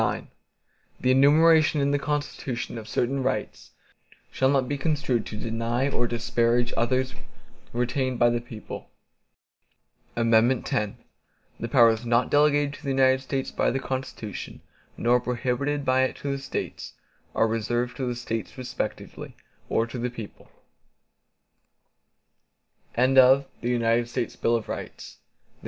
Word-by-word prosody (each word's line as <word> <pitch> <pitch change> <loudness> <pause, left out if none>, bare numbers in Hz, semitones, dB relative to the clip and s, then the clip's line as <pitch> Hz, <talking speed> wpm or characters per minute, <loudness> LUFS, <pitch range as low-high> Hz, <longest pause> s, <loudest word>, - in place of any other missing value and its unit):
IX - - -1 0.7
The 130 - +2
enumeration 155 +3 +5
in 140 0 +2
the 145 - +1
Constitution, 140 -5 -3
of 110 - -10
certain 135 +4 0
rights, 110 -5 -3 0.6
shall 130 - +2
not 135 -2 +2
be 145 - -1
construed 140 -5 0
to 105 - -6
deny 115 +4 -1
or 120 -3 0
disparage 120 +1 +1
others 130 +3 0 0.6
retained 125 +1 -1
by 120 0 +4
the 120 0 -1
people. 115 -2 -9 1.3
X 115 - +1
The 115 -1 -1
powers 115 -2 +5
not 120 +1 +1
delegated 145 -1 +3
to 145 - -12
the 140 - -3
United 130 -1 +3
States 135 0 -3
by - - +1
the - - -1
Constitution, 130 -6 -5 0.4
nor 120 +1 +3
prohibited 125 +4 -2
by 130 0 +3
it 130 - 0
to 140 - -4
the 140 - -2
States, 135 - -5 0.4
are 115 - +3
reserved 120 +2 -1
to 130 -3 -2
the 120 - -2
States 115 0 -5
respectively, 130 -1 -5 0.3
or 115 - +2
to 120 +2 -7
the 125 +1 -1
people. 115 -4 -10
125 Hz, 120 wpm, -26 LUFS, 115-135 Hz, 1.3 s, enumeration